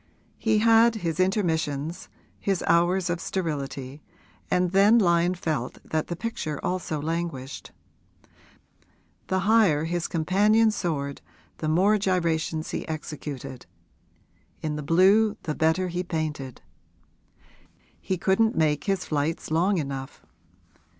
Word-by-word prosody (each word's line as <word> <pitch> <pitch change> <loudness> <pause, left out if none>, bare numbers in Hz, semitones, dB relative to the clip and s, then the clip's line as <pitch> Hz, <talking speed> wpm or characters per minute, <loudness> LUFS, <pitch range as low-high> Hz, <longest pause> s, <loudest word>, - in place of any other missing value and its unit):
He 220 -1 +2
had 225 +1 +5
his 170 -6 -3
intermissions, 165 -5 -1 0.3
his 195 -3 -1
hours 175 +2 +2
of 175 -1 -2
sterility, 145 -6 -4 0.5
and 180 -1 +1
then 200 +4 +5
Lyon 175 -3 +3
felt 155 -8 -3
that 155 -1 -2
the 175 - -4
picture 170 -7 -4
also 180 -4 -2
languished. 155 -4 -4 1.6
The 190 0 0
higher 195 -7 +4
his 170 +1 -2
companion 210 +7 +3
soared, 145 -9 -3 0.4
the 155 - -2
more 195 +6 +3
gyrations 165 -4 -1
he - - -4
executed, 150 -4 -6 1.0
in 155 -1 -2
the 150 - -4
blue, 195 +8 +4
the 155 - -2
better 160 +4 +1
he 175 0 -2
painted; 155 -7 -4 1.4
he 185 - -2
couldn't 205 +5 +2
make 150 -2 +1
his 195 -3 -1
flights 155 +1 -2
long 180 +5 +2
enough. 135 - -5
170 Hz, 115 wpm, -26 LUFS, 155-190 Hz, 1.6 s, had